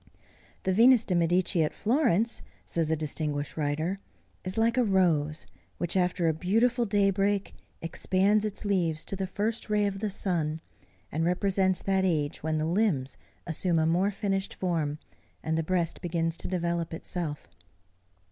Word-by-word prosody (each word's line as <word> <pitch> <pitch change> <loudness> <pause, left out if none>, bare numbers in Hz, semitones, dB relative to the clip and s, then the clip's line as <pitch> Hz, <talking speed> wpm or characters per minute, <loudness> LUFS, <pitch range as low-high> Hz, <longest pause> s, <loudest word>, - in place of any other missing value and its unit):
"The 190 - +1
Venus 235 +3 +6
de 185 - -1
Medici 175 0 +2
at 155 - -2
Florence," 230 - +1 0.2
says 165 -2 -1
a 160 - +2
distinguished 150 -1 -3
writer, 155 +5 -1 0.4
"is 185 +3 -4
like 230 +1 +3
a 255 - +3
rose 165 -7 +2 0.3
which, 175 +1 -2
after 180 -2 +1
a 160 - +3
beautiful 230 +8 +1
daybreak, 200 0 +1 0.3
expands 195 +5 +2
its 210 -1 -4
leaves 170 -6 0
to - - -3
the 190 0 -3
first 215 +4 -2
ray 210 -1 +2
of 195 -1 -2
the 215 +1 -1
sun, 165 -5 -1 0.5
and 160 +2 -1
represents 185 +1 +1
that 190 -1 +1
age 155 -5 0
when 155 0 -1
the 155 - 0
limbs 165 -7 0 0.3
assume 170 +1 0
a 160 - +3
more 175 +5 +2
finished 195 -1 -2
form 160 -5 -1 0.5
and 160 - -1
the 165 - +1
breast 170 0 -1
begins 165 -1 -1
to - - -4
develop 170 -2 -2
itself." 160 -3 -5
180 Hz, 155 wpm, -28 LUFS, 160-200 Hz, 0.5 s, Venus